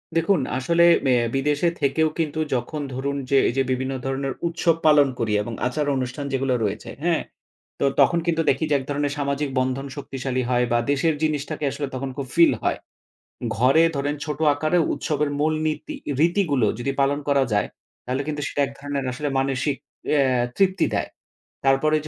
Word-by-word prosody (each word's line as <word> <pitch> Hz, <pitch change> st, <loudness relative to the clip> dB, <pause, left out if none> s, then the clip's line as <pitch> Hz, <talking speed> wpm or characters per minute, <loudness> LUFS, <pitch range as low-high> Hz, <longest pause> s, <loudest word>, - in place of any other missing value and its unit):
দেখুন, 165 Hz, +1 st, +3 dB, 0.2 s
আসলে 170 Hz, +6 st, +2 dB, 0.2 s
ম্যা 130 Hz, -, +4 dB, 0.2 s
বিদেশে 145 Hz, +4 st, +1 dB
থেকেও 155 Hz, +3 st, +2 dB
কিন্তু 160 Hz, -1 st, -1 dB, 0.2 s
যখন 130 Hz, +5 st, -3 dB
ধরুন 140 Hz, +2 st, -2 dB
যে 140 Hz, -, +4 dB
এই -, -, -2 dB
যে 135 Hz, -, +3 dB
বিভিন্ন 130 Hz, +1 st, -1 dB
ধরনের 135 Hz, 0 st, -2 dB
উৎসব 170 Hz, 0 st, +1 dB
পালন 150 Hz, -2 st, +6 dB
করি 110 Hz, -3 st, 0 dB
এবং 115 Hz, +2 st, -6 dB
আচার 150 Hz, +4 st, -1 dB
অনুষ্ঠান 130 Hz, +2 st, -3 dB
যেগুলো 135 Hz, -1 st, +1 dB
রয়েছে 105 Hz, +1 st, -3 dB
হ্যাঁ? 170 Hz, -1 st, +2 dB, 0.6 s
তো -, -, +2 dB, 0.2 s
তখন 170 Hz, -, +4 dB
কিন্তু 165 Hz, -1 st, +2 dB
দেখি 135 Hz, +3 st, +1 dB
যে 145 Hz, -, +3 dB
এক -, -, -7 dB
ধরনের 145 Hz, 0 st, -1 dB
সামাজিক 140 Hz, 0 st, -1 dB
বন্ধন 130 Hz, +2 st, -1 dB
শক্তিশালী 135 Hz, -2 st, -3 dB
হয় 125 Hz, 0 st, +2 dB
বা 120 Hz, -, +4 dB
দেশের 155 Hz, +3 st, +2 dB
জিনিসটাকে 155 Hz, 0 st, -1 dB
আসলে 145 Hz, 0 st, -4 dB
তখন 135 Hz, +1 st, -3 dB
খুব 140 Hz, -2 st, -4 dB
ফিল 170 Hz, 0 st, +6 dB
হয়। -, -, +1 dB, 0.8 s
ঘরে 135 Hz, +7 st, +5 dB
ধরেন 145 Hz, +1 st, -1 dB
ছোট 150 Hz, -2 st, -4 dB
আকারে 155 Hz, +4 st, +1 dB
উৎসবের 150 Hz, -1 st, -1 dB
মূল 155 Hz, +1 st, +2 dB
নীতি, 155 Hz, -, -3 dB, 0.2 s
রীতিগুলো 165 Hz, -, +2 dB
যদি 135 Hz, +3 st, -1 dB
পালন 140 Hz, +1 st, +2 dB
করা 140 Hz, -1 st, +4 dB
যায় 105 Hz, -, +1 dB, 0.4 s
তাহলে 130 Hz, +2 st, -1 dB
কিন্তু 150 Hz, -1 st, -3 dB
সেটা 145 Hz, -, -1 dB
এক 135 Hz, -, -8 dB
ধরণের 140 Hz, -1 st, -3 dB
আসলে 145 Hz, +3 st, -3 dB
মানসিক 135 Hz, +1 st, 0 dB, 0.4 s
অ্যা 145 Hz, -2 st, +4 dB, 0.3 s
তৃপ্তি 190 Hz, -2 st, +3 dB
দেয়। -, -, -1 dB, 0.6 s
তারপরে 135 Hz, +3 st, +3 dB
140 Hz, 175 wpm, -23 LUFS, 135-155 Hz, 0.8 s, পালন